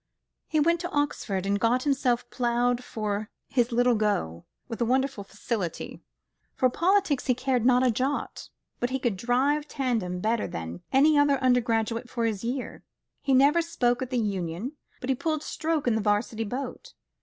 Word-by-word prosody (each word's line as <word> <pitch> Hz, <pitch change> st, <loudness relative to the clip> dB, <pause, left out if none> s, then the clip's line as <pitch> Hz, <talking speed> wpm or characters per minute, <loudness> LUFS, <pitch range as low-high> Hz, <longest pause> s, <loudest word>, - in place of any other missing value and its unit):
He 310 Hz, -, +1 dB
went 335 Hz, +3 st, +3 dB
to 350 Hz, +1 st, -4 dB
Oxford, 260 Hz, -, -1 dB
and 200 Hz, +1 st, +1 dB
got 245 Hz, +3 st, +2 dB
himself 260 Hz, -4 st, +1 dB
ploughed 245 Hz, 0 st, +1 dB
for 210 Hz, -2 st, -3 dB, 0.2 s
his 245 Hz, -1 st, +1 dB
Little 245 Hz, +1 st, +3 dB
Go, 205 Hz, -, -1 dB, 0.2 s
with 230 Hz, 0 st, -6 dB
a -, -, +3 dB
wonderful 260 Hz, -2 st, 0 dB
facility. 195 Hz, -3 st, -4 dB, 0.5 s
For 255 Hz, -1 st, +2 dB
politics 360 Hz, -4 st, +2 dB
he 250 Hz, -, +3 dB
cared 255 Hz, -2 st, +1 dB
not 250 Hz, 0 st, +4 dB
a 250 Hz, -, +4 dB
jot, 260 Hz, +5 st, -2 dB, 0.3 s
but 245 Hz, -, 0 dB
he 265 Hz, -, -1 dB
could 240 Hz, -6 st, -1 dB
drive 265 Hz, +8 st, +1 dB
tandem 230 Hz, -11 st, -1 dB
better 220 Hz, +3 st, 0 dB
than 85 Hz, +1 st, -6 dB
any 290 Hz, +3 st, +5 dB
other 290 Hz, -1 st, +4 dB
undergraduate 230 Hz, -2 st, +1 dB
of 240 Hz, -1 st, -2 dB
his 215 Hz, -3 st, -2 dB
year. 250 Hz, +2 st, -4 dB, 0.4 s
He 270 Hz, -2 st, +2 dB
never 285 Hz, +6 st, +5 dB
spoke 245 Hz, -8 st, 0 dB
at 255 Hz, -, -3 dB
the 255 Hz, -, -1 dB
Union, 195 Hz, -, -2 dB, 0.3 s
but 255 Hz, -, -5 dB
he -, -, +2 dB
pulled 310 Hz, +3 st, -2 dB
stroke 315 Hz, -1 st, -2 dB
in 240 Hz, -, +3 dB
the 220 Hz, -, 0 dB
'Varsity 215 Hz, +2 st, 0 dB
boat. 255 Hz, +6 st, -6 dB
245 Hz, 175 wpm, -27 LUFS, 220-275 Hz, 0.5 s, any